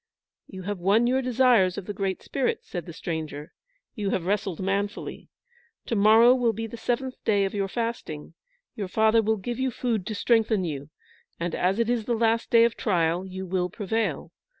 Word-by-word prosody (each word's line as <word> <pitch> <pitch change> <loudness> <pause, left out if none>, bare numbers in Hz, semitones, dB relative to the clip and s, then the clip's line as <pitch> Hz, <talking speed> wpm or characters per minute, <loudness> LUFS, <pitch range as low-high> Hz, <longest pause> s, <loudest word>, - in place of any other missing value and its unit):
"You 190 -1 -9
have 205 0 -4
won 200 +6 +3
your 260 +2 +2
desires 245 -7 +3
of 200 - -5
the 205 - -4
Great 195 -1 -3
Spirit," 270 -3 -1
said 175 -1 -6
the - - -6
stranger. 155 -1 -5 0.4
"You 205 -4 -2
have 185 -3 -1
wrestled 195 -3 -1
manfully. 200 +2 -3 0.6
To 230 - -2
morrow 220 +4 +7
will 245 -3 +2
be 225 +2 -4
the 225 - -7
seventh 250 +3 -3
day 200 -2 +2
of 195 - -3
your 200 -2 -1
fasting, 210 -9 -4 0.4
your 200 -3 -4
father 220 +3 +3
will 220 0 +1
give 240 +5 -5
you 260 0 +1
food 230 -5 -2
to 215 - -3
strengthen 220 -3 +2
you, 145 -3 -5 0.5
and 170 0 -2
as 185 +3 +1
it 230 -1 +1
is 235 -2 0
the 235 - 0
last 230 0 +1
day 230 -1 +6
of 235 0 +2
trial, 175 -2 0
you 190 0 -6
will 180 0 -1
prevail. 220 +3 -2
205 Hz, 195 wpm, -26 LUFS, 185-230 Hz, 0.6 s, morrow